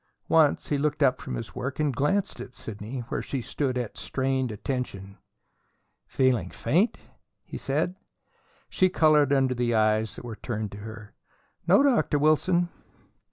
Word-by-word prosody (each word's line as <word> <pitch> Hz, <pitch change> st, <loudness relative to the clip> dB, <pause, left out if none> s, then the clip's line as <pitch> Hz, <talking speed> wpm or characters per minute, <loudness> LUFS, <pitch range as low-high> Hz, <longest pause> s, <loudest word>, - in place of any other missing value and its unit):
Once 155 Hz, -3 st, +3 dB
he 145 Hz, -, +1 dB
looked 150 Hz, 0 st, +1 dB
up 130 Hz, -2 st, +3 dB
from -, -, -5 dB
his 115 Hz, -, -6 dB
work 130 Hz, +3 st, -4 dB
and 145 Hz, -4 st, +1 dB
glanced 185 Hz, +10 st, 0 dB
at 125 Hz, -, -9 dB
Sidney 110 Hz, +4 st, -6 dB
where -, -, -2 dB
she 135 Hz, -, -3 dB
stood 130 Hz, +1 st, -2 dB
at 120 Hz, -3 st, -4 dB
strained 130 Hz, -2 st, -1 dB
attention. 100 Hz, -4 st, -5 dB, 0.9 s
"Feeling 130 Hz, -3 st, +1 dB
faint?" 200 Hz, +9 st, +1 dB, 0.5 s
he -, -, -10 dB
said. 150 Hz, +6 st, -1 dB, 0.7 s
She 185 Hz, -, +2 dB
colored 155 Hz, -5 st, +4 dB
under 135 Hz, -2 st, +3 dB
the 120 Hz, -1 st, 0 dB
eyes 110 Hz, 0 st, +2 dB
that -, -, -9 dB
were 115 Hz, -2 st, -6 dB
turned 110 Hz, -1 st, -4 dB
on 100 Hz, -, -8 dB
her. 110 Hz, 0 st, -9 dB, 0.5 s
"No, 195 Hz, +10 st, +6 dB
Dr. 245 Hz, -, +3 dB
Wilson." 170 Hz, +4 st, +3 dB
130 Hz, 155 wpm, -27 LUFS, 115-150 Hz, 0.9 s, No